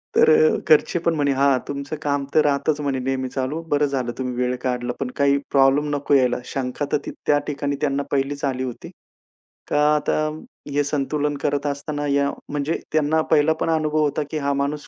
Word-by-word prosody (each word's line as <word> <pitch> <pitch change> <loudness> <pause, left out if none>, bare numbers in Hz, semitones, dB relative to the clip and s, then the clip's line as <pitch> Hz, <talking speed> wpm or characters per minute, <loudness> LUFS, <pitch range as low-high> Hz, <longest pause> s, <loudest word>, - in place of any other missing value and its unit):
तर 460 0 +6
अ, 460 0 +5
घरचे 440 - +4
पण 170 0 +1
म्हणे, 145 -2 +1
"हा 135 -1 +3
तुमचं 140 +2 -4
काम 145 -1 0
तर 155 - +7
राहातच 145 +1 +1
म्हणे 135 -2 -1
नेहमी 130 0 -2
चालू. 135 +5 -3
बरं 145 0 +3
झालं 130 -4 -2
तुम्ही 125 -1 -3
वेळ 125 0 0
काढला 125 -1 -1
पण 130 -2 -3
काही 140 0 +3
प्रॉब्लेम 140 +2 +3
नको 145 0 -1
यायला." 130 -3 +4
शंका 135 +2 -3
तर - - +3
ती - - -4 0.2
त्या 145 0 +4
ठिकाणी 145 -1 -2
त्यांना 140 -1 0
पहिलीच 140 +1 -1
आली 130 -1 -1
होती. 125 -2 -7 0.8
का 150 - +1 0.2
आता 150 - 0 0.6
हे 145 0 +2
संतुलन 145 +1 -1
करत 145 0 -1
असताना 145 +1 -3
या 140 0 +2 0.2
म्हणजे 145 +2 -1 0.2
त्यांना 155 +1 +2
पहिला 155 0 +4
पण - - 0
अनुभव 155 -1 0
होता, 150 0 0
की 155 - -2
हा 140 -1 0
माणूस 145 +2 -2
145 Hz, 195 wpm, -22 LUFS, 135-150 Hz, 0.8 s, तर